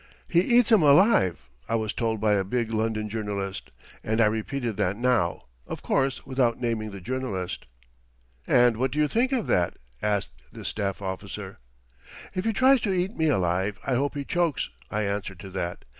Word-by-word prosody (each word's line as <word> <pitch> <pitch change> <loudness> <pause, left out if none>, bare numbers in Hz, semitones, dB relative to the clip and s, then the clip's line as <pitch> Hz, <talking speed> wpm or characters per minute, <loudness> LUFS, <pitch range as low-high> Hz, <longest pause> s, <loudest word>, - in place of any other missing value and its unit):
"He 170 - +3
eats 240 +3 +4
'em 220 -5 +7
alive," 145 - +4 0.2
I 115 - +1
was 110 -2 -1
told 115 -2 -1
by 110 0 +2
a 100 -1 +2
big 115 +3 -2
London 110 -1 -1
journalist, 100 -3 -4 0.3
and 110 +1 -1
I 115 - +6
repeated 110 +2 -1
that 95 +3 0
now, 120 -8 +1 0.2
of - - -6
course 135 -1 0
without 125 -3 +1
naming 115 -3 -1
the 100 -1 -8
journalist. 95 -4 -4 0.8
"And 120 -2 +4
what 130 +3 +1
do 145 - -5
you 150 0 +3
think 245 - +1
of 250 -6 0
that?" 85 -1 +1 0.3
asked 105 -2 -2
this - - -5
staff 100 -2 -3
officer. 95 +1 -6 0.7
"If 185 - -3
he 225 - +2
tries 260 +3 +4
to 205 - 0
eat 185 +4 -1
me 160 -1 +2
alive 95 -3 0
I 135 - 0
hope 140 +4 0
he 140 -1 -3
chokes," 170 -3 0 0.2
I 105 0 -1
answered 100 -2 -3
to 95 -2 -9
that. 90 -2 -4
115 Hz, 185 wpm, -26 LUFS, 100-140 Hz, 0.8 s, em